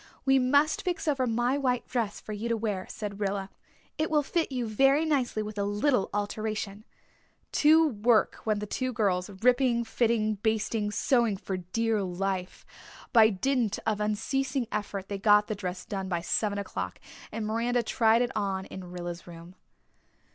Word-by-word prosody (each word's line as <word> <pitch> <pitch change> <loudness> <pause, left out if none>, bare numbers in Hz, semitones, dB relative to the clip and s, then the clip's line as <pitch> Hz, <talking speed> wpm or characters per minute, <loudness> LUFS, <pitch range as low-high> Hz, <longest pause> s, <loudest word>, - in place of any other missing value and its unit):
"We 270 0 +5
must 285 +4 +3
fix 355 -2 -3
over 270 -4 +1
my 240 +4 +1
white 250 -3 0
dress 230 -5 -2
for 215 - -7
you 215 +3 -4
to 230 - +1
wear," 210 -4 -3
said 205 -2 -6
Rilla. 195 -1 -2 0.5
"It 310 - +1
will 300 -1 +2
fit 325 +1 -1
you 250 -2 -2
very 270 +8 +3
nicely 255 -8 0
with 210 -1 -6
a - - +1
little 205 +3 +1
alteration." 210 0 -3 0.7
To 315 +2 +5
work 225 -3 +2
went 215 -2 0
the - - -2
two 255 +4 -2
girls, 190 -4 0
ripping, 240 +4 +2
fitting, 225 -2 0
basting, 220 -1 0
sewing 230 -1 +2
for 190 0 -4
dear 215 +4 -1
life. 185 0 -3 0.5
By 220 -2 +7
dint 230 +1 0
of 215 -1 0
unceasing 255 +5 -1
effort 200 -2 -3
they 200 -1 -4
got 210 0 +5
the 215 - -3
dress 185 -3 -5
done 195 -2 -4
by 175 -2 -1
seven 205 +4 0
o'clock 200 - -4 0.3
and 220 0 -3
Miranda 235 +3 0
tried 225 +1 +3
it 245 - -2
on 195 -2 -1
in 185 -2 -9
Rilla's 175 -1 -6
room. 170 +1 -11
215 Hz, 170 wpm, -28 LUFS, 200-245 Hz, 0.7 s, By